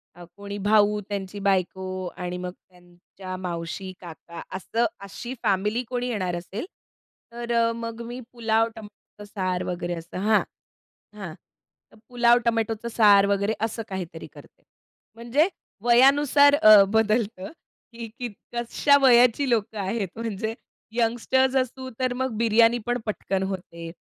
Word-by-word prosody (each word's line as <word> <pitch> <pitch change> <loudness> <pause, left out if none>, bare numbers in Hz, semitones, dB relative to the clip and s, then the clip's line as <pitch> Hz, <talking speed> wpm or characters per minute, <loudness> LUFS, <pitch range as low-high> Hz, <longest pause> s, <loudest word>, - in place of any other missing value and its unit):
अ, 175 - -12
कोणी 200 0 -7
भाऊ, 210 +1 +3
त्यांची 200 0 -5
बायको 185 -1 -1
आणि 180 0 -4
मग 180 0 -5 0.2
त्यांच्या 180 +1 -11
मावशी, 180 +1 -5
काका 170 0 -10 0.2
असं 230 +5 -1 0.2
अशी 240 +5 -7
फॅमिली 210 +5 +1
कोणी 250 0 -2
येणार 185 -6 -2
असेल, 190 - -6 0.7
तर 235 0 -6
अ, 230 0 +3
मग 230 0 -6
मी 245 +2 -7
पुलाव, 225 -1 +1
टोमॅटोच 210 -1 -13
सार 185 -3 -1
वगैरे 175 -1 -3
असं 165 +2 -9
हां, 215 +2 +3 0.8
हां. 175 -6 -6 0.6
तर - - -20
पुलाव 240 -1 +4
टोमॅटोचं 225 0 -1
सार 205 -3 +5
वगैरे 200 +1 +1
असं 225 0 -2
काहीतरी 175 -4 -6
करते. - - -17 0.5
म्हणजे 240 +8 +1 0.4
वयानुसार 280 +4 +5
अ, 215 -8 +8
बदलतं 220 -2 0 0.4
की 230 0 -7
की 245 - -2 0.3
कशा 240 +4 +2
वयाची 250 +1 +5
लोकं 220 -2 0
आहेत 195 +1 -2
म्हणजे 220 -1 -3 0.4
यंगस्टर्स 245 +3 +1
असू, 260 0 -2
तर 255 -1 0
मग 260 -2 -3
बिर्याणी 230 +1 +4
पण 245 0 0
पटकन 195 -2 -2
होते. 170 -3 -6
215 Hz, 135 wpm, -25 LUFS, 190-235 Hz, 0.8 s, अ